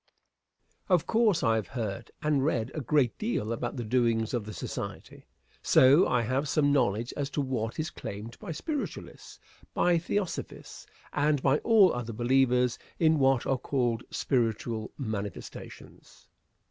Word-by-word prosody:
Answer. 190 - +1
Of 170 - -1
course 220 -6 +2
I 115 -2 +3
have 105 -5 -3
heard 105 -4 -5
and 150 -3 +2
read 125 -5 0
a 155 - -4
great 135 -3 +2
deal 210 - -1
about 115 - -4
the 120 - -3
doings 115 -1 +1
of 120 -4 -1
the 105 - -7
Society; - - -7 0.3
so, 135 +7 +6
I 125 -2 +1
have 130 +5 -1
some 145 -1 +2
knowledge 120 -4 +1
as 140 -1 -2
to 145 - -2
what 120 -4 -3
is 155 +2 -2
claimed 105 +4 -8
by 190 - -7
Spiritualists, 285 - -6 0.4
by 175 -1 +3
Theosophists, 190 +2 -4 0.3
and 150 0 +2
by 140 +2 +3
all 215 -5 +5
other 120 -2 -4
believers 125 +1 +2 0.2
in 160 -2 +3
what 135 -2 +3
are 135 -1 0
called 120 -4 -1
"spiritual 115 -3 -1
manifestations." 110 -6 -7
130 Hz, 150 wpm, -28 LUFS, 115-150 Hz, 0.4 s, so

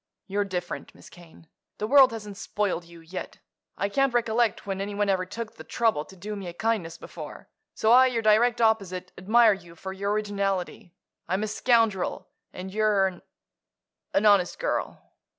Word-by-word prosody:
You're 200 +1 -1
different, 180 -2 -5
Miss - - -15
Kane; 165 -2 -16 0.3
the 210 - -2
world 265 +2 +7
hasn't 210 -3 -7
spoiled 205 -4 -2
you 170 0 -14
yet. 170 +3 -7 0.4
I 200 - 0
can't 275 +3 +1
recollect 235 -1 +1
when 195 -1 -3
anyone 205 0 -1
ever 185 -1 +1
took 225 +3 -7
the 160 - -9
trouble 215 -3 0
to 190 - -15
do 210 +3 -6
me 195 -3 -6
a 175 - -6
kindness 200 -4 -1
before. - - -10 0.3
So 220 - +2
I, 260 +2 +8
your 235 -3 -1
direct 225 +3 +4
opposite, 190 -5 +1
admire 220 +4 +5
you 175 -3 -11
for 190 +3 -7
your 200 +1 -2
originality. 200 -2 -2 0.3
I'm 190 +3 0
a - - -1
scoundrel 225 -3 +1 0.2
and 190 +1 -8
you're 210 -3 +3
a—an 185 +3 -8
honest 200 -4 +4
girl." - - -3
205 Hz, 170 wpm, -26 LUFS, 185-225 Hz, 0.4 s, I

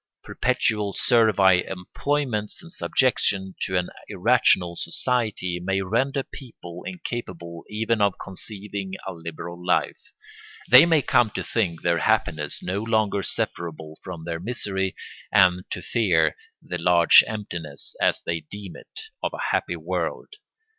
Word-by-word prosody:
Perpetual 110 -5 0
servile 100 -6 +4
employments 110 - -2
and 170 - -12
subjection 100 - +1
to 95 - 0
an 90 - -1 0.2
irrational 85 -2 +2
society 105 -3 -1
may 95 +1 0
render 135 +8 0
people 90 - -11
incapable 95 - -6
even 110 +1 0
of 100 -2 +3
conceiving 100 0 -6
a 95 - -4
liberal 85 +1 -8
life. 90 - 0 0.7
They - - +9
may 160 -4 +3
come 120 -2 +3
to - - -2
think 90 -8 -1
their 85 -1 +2
happiness 75 -1 0
no 95 +3 -2
longer 110 -3 +1
separable 80 -4 -3
from 90 -4 -7
their 85 0 -4
misery 95 -2 -2 0.4
and 90 -2 +4
to - - -5
fear 85 - +2 0.3
the 90 - -5
large 85 0 +7
emptiness, 85 -9 -5
as - - +2
they 85 -1 -1
deem 95 +5 -9
it, - - -10 0.2
of - - -2
a - - -2
happy - - 0
world. - - -4
95 Hz, 135 wpm, -24 LUFS, 85-110 Hz, 0.7 s, They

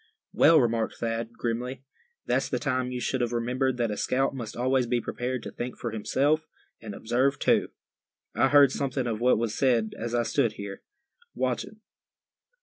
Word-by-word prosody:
"Well," 165 -1 +6
remarked 115 -2 0
Thad, 115 0 -3
grimly, 125 +3 -3 0.4
"that's - - 0
the - - 0
time 130 -3 -1
you 125 - -3
should 130 +1 -1
have 120 -1 0
remembered 125 +2 0
that 120 -3 0
a 105 - -3
scout 135 +2 +1
must 120 -5 -6
always 130 0 +1
be 120 0 +1
prepared 125 +1 -3
to - - -6
think 125 +1 -5
for 120 - -4
himself, 145 +8 +1 0.3
and 105 -3 -7
observe 130 +5 +1
too. - - +2 0.6
I 120 - +3
heard 140 -1 +6
something 135 -2 -2
of 115 -2 -2
what 125 +1 +4
was 115 -1 -2
said 120 -5 +2
as 120 +1 -3
I 120 - +2
stood 115 0 +1
here, 100 -2 -7 0.5
watching. - - -2
120 Hz, 175 wpm, -27 LUFS, 115-130 Hz, 0.6 s, Well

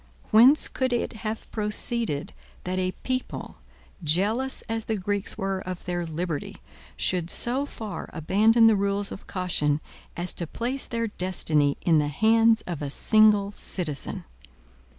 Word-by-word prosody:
Whence 250 +7 +6
could 260 -1 -1
it 240 - -1
have 220 0 -4
proceeded, 210 - -1 0.3
that 185 +1 -2
a 185 0 -1
people, 255 0 -4 0.5
jealous 210 - +1
as 225 0 -3
the 220 - -1
Greeks 205 0 -3
were 195 0 -1
of 185 -1 -6
their 175 -1 -3
liberty, 160 -1 -4 0.4
should 175 -2 0
so 260 +8 0
far 220 -6 -7
abandon 215 +8 +4
the 225 -1 +6
rules 200 0 -1
of - - -9
caution 155 -6 0 0.4
as 175 +1 0
to 170 - -3
place 250 - -3
their 230 -1 -1
destiny 160 -8 0
in 165 -3 +5
the 150 - +1
hands 225 +8 +4
of 170 -5 -5
a 145 - -3
single 210 +4 +4
citizen? 165 -8 -3
200 Hz, 145 wpm, -26 LUFS, 175-225 Hz, 0.5 s, Whence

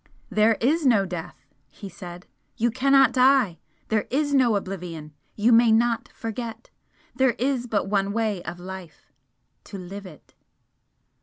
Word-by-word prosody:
"There 215 +2 +3
is 305 +7 +1
no 225 -8 +4
death!" 175 -5 -7 0.2
he 200 - -10
said 175 -1 -10 0.3
"You 235 +1 +1
cannot 270 +2 +4
die! 255 -8 +3 0.3
There 215 -2 0
is 290 +2 0
no 250 -5 +4
oblivion, 175 -6 -5 0.2
you 220 +3 +2
may 230 0 +6
not 230 +1 +1
forget! 225 0 -7 0.4
There 260 -2 +2
is 255 -1 -1
but 210 -3 0
one 200 0 0
way 215 -4 -1
of 175 +1 -7
life 180 -5 -10 0.5
to 200 - -8
live 195 +2 -8
it!" 155 -6 -16
220 Hz, 145 wpm, -24 LUFS, 190-245 Hz, 0.5 s, may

